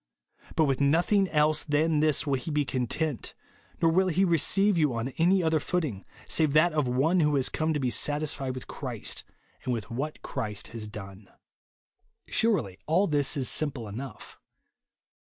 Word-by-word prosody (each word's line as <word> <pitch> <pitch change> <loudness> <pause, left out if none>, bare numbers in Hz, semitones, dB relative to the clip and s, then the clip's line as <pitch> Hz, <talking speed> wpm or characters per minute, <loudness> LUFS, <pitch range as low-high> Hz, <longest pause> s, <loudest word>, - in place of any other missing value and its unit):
But 160 - +4
with 135 -1 0
nothing 175 +8 +3
else 150 0 +2
than 155 +1 +1
this 155 0 +2
will 140 - 0
he 135 +4 -2
be 150 -1 +1
content, 130 +2 -2 0.5
nor 165 - +5
will 185 +3 +3
he 185 +2 +2
receive 195 +4 +3
you 150 -7 +2
on 115 +3 -2
any 180 +3 +4
other 160 -1 +2
footing, 150 - -2 0.2
save 155 -3 +2
that 155 +2 +4
of 150 -4 +1
one 140 +9 +2
who 150 -2 +3
has 135 -2 +2
come 160 0 -1
to - - 0
be 130 -3 0
satisfied 145 -2 -1
with 130 - -7
Christ, - - -5 0.4
and 125 - -2
with 115 -4 -4
what 145 +6 -4
Christ 105 -6 -4
has 110 -2 -7
done. 100 -1 -10 1.0
Surely 150 - 0
all 170 +6 +3
this 145 -5 0
is 130 -3 -1
simple 140 -7 -2
enough. 125 +7 -8
150 Hz, 170 wpm, -28 LUFS, 130-160 Hz, 1.0 s, nor